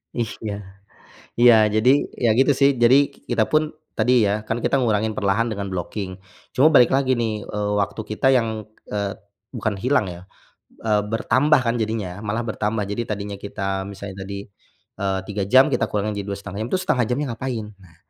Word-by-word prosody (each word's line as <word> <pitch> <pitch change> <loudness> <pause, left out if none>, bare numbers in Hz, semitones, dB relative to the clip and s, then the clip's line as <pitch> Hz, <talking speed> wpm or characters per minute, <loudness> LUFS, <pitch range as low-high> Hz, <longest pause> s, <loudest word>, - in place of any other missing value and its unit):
Ih, 115 -3 -2
ya. 105 -2 -4 0.9
Iya, 120 -1 +8 0.3
jadi, 125 - +4 0.3
ya - - +5
gitu 135 +2 +4
sih. 140 - +6
Jadi, 120 +3 +7 0.3
kita 115 -3 +1
pun 155 0 +1 0.2
tadi 125 - +2 0.2
ya, 105 +1 -1
kan 115 +2 -2
kita - - +1
ngurangin 110 -4 0
perlahan 105 +4 +1
dengan 100 -3 -4
blocking. 95 +2 -4 0.4
Cuma 135 +5 +5
balik 125 -2 +7
lagi 130 -2 +2
nih, 115 -2 -1 0.2
eee, 105 0 -2
waktu 100 - -2
kita 105 +5 -2
yang, 115 -2 +1 0.4
eee, 100 -1 -1 0.4
bukan 110 -2 -1
hilang 125 -3 +2
ya, 85 - -10 0.7
eee, 105 -1 +3
bertambah 135 +6 +3
kan 115 0 +1
jadinya, 105 -4 -3
malah 110 +3 -2
bertambah. 105 0 -1
Jadi, 105 +4 -2
tadinya 100 -1 -4
kita 100 0 -8 0.3
misalnya 95 0 -8
tadi, 100 +1 -7 0.5
eee, 95 -1 0
3 105 -1 -2
jam, 130 +2 +7
kita - - +2
kurangi 105 0 -1
jadi - - -12
2,5 100 -1 -6
jam, 115 - -4
itu 185 - +1
1/2 125 -9 +1
jamnya 135 +4 0
ngapain? 120 -2 -4 0.2
Nah, 85 -4 -19
110 Hz, 180 wpm, -22 LUFS, 100-120 Hz, 0.9 s, Iya